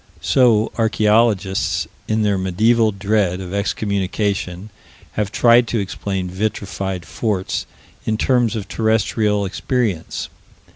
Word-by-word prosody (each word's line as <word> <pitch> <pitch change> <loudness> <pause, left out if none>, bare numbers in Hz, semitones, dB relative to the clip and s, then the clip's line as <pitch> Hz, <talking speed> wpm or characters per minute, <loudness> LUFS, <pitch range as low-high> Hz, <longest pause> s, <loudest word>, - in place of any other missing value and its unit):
So 115 -4 +3
archaeologists, 110 -3 +2 0.2
in 110 0 +1
their 105 -1 +2
medieval 110 +5 +2
dread 100 -2 0
of 95 -1 -7
excommunication, 100 -1 -2 0.4
have 105 -1 -2
tried 120 +1 +5
to 115 - -1
explain 95 -1 -3
vitrified 95 -1 -3
forts 100 -3 -2 0.4
in 110 - -1
terms 120 -2 +2
of 100 -3 -4
terrestrial 110 -1 +1
experience. 105 - -2
105 Hz, 105 wpm, -20 LUFS, 95-110 Hz, 0.4 s, tried